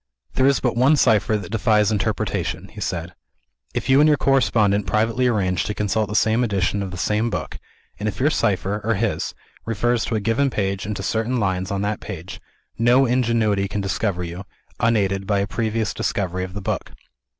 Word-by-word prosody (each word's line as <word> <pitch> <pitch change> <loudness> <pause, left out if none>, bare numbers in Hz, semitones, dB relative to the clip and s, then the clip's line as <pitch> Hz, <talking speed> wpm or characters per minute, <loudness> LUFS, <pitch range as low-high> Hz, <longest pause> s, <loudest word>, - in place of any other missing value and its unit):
"There 130 - +3
is 140 -1 +3
but 125 -3 0
one 130 +6 +4
cipher 110 -5 +3
that 100 -3 -8
defies 105 0 +2
interpretation," 105 -3 -2
he - - -10
said. - - -3 0.6
"If - - -2
you 135 +1 +5
and 150 - +6
your 150 -1 +4
correspondent 110 -7 +2
privately 115 +4 +1
arrange 95 -6 +1
to 105 - -3
consult 105 0 0
the 105 - -4
same 110 +3 +3
edition 100 -2 0
of 95 - -3
the 90 - -7
same 105 +5 0
book, - - -5 0.4
and 105 +1 -1
if 105 - -7
your 145 +4 +3
cipher, 105 -4 0
or 115 +1 +1
his, 105 +1 -2 0.3
refers 115 +1 0
to - - -2
a - - +1
given 115 +7 +1
page 95 -4 -2
and 105 - -3
to - - -5
certain 115 +3 0
lines 95 -3 -1
on 100 0 -2
that 105 +1 -1
page, 95 -4 -8 0.4
no 120 +3 +5
ingenuity 115 -5 +1
can 100 +1 -3
discover 95 -2 -1
you, 85 +2 -6 0.4
unaided 100 -4 +1
by 100 -1 +2
a 100 - +1
previous 110 +1 -2
discovery 90 -2 -2
of 95 +1 -7
the 100 - -4
book. - - -3
105 Hz, 195 wpm, -22 LUFS, 100-115 Hz, 0.6 s, and